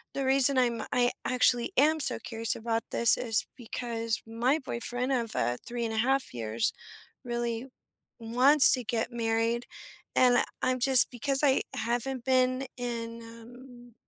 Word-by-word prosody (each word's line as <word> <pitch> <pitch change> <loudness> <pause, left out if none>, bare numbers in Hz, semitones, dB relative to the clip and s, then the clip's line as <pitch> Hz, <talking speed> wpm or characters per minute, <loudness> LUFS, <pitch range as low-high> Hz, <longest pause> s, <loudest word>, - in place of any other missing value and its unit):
the 275 - -2
reason 270 0 +3
I'm 240 -2 +1
I 245 0 +2
actually 245 -1 +1
am 310 +4 +3
so - - +3
curious 225 -1 -3
about 225 0 -2
this 235 - +5
is 225 -3 +1
because 230 -2 -4
my 240 +6 0
boyfriend 245 0 -4
of, 235 -4 -2
uh, 120 0 -1
3-1/2 240 - -1
years 115 -1 -2 0.5
really 240 0 -4 0.5
wants 255 +5 +6
to 250 -2 -3
get 235 +1 -2
married, 230 +1 -1 0.5
and 250 -1 +4 0.2
I'm 255 0 0
just 255 0 +5
because 270 +2 -2
I 270 -2 +3
haven't 240 +2 -3
been 255 0 +1
in, 235 -1 -5
um, 240 +1 -14
240 Hz, 135 wpm, -28 LUFS, 230-255 Hz, 0.5 s, wants